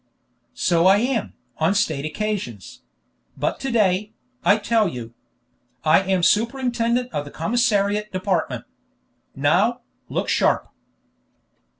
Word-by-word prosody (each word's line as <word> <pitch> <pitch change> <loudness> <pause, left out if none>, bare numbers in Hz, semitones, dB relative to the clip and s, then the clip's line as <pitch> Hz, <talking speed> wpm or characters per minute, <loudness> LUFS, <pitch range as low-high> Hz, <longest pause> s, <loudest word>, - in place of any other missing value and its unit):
"So 170 -1 +3
I 195 +1 +6
am, 240 +1 -1 0.3
on 165 +5 +2
state 155 -8 0
occasions; 155 - -4 0.6
but - - -1
to 270 - -3
day, 210 -2 +1 0.3
I 205 - +5
tell 215 0 +2
you. 120 -7 -7 0.7
I 155 +3 +5
am 190 -2 0
superintendent 240 +2 +1
of 145 - -1
the 145 - -10
commissariat 210 - 0
department. 185 -2 -2 0.7
Now, 190 - +2 0.3
look - - -2
sharp!" - - +1
205 Hz, 110 wpm, -22 LUFS, 165-230 Hz, 0.7 s, I